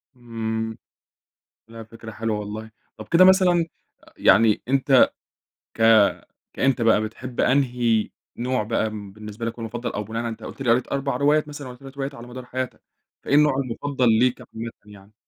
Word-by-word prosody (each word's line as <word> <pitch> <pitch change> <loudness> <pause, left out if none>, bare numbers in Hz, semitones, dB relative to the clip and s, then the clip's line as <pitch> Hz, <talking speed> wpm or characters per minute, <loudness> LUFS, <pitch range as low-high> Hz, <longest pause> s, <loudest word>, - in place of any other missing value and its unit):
إمم، 110 -2 -4 0.9
لا 115 0 -10
فكرة 110 0 -11
حلوة 110 -1 -2
والله. 110 +2 -7 0.3
طَب 110 - -9
كده 175 +3 +6
مثلًا 185 -3 +5 0.4
أ - - -20
يعني 110 0 +4
أنت 135 0 +4 0.6
ك 115 - -7 0.7
كأنت 130 -2 +1
بقى، 115 -2 +4
بتحب 120 +3 -5
أنهي 120 -5 +2 0.3
نوع 125 -2 -1
بقى 110 0 -1
م 105 -2 -8
بالنسبة 105 +2 -8
لك 115 - -2
هو 120 - -15
المُفَضّل، 115 +2 -4
أو 105 - -3
بناءً 115 +2 -4
على 115 - -3
أنت - - -9
قُلت 135 - -9
لي 120 -3 +2
قريت 125 +2 +2
4 140 0 -1
روايات 150 +1 +2
مثلًا 145 -2 -8
والَّا 125 0 -10
3 135 0 -12
روايات 135 0 -4
على 120 0 -10
مدار 125 0 -9
حياتك، 130 0 -5 0.4
فإيه 140 - +1
النوع 150 -1 +5
المفضل 130 0 -1
ليك 125 0 +2
عامةً 115 +1 -7
يعني؟ 105 0 -16
120 Hz, 175 wpm, -23 LUFS, 110-135 Hz, 0.9 s, كده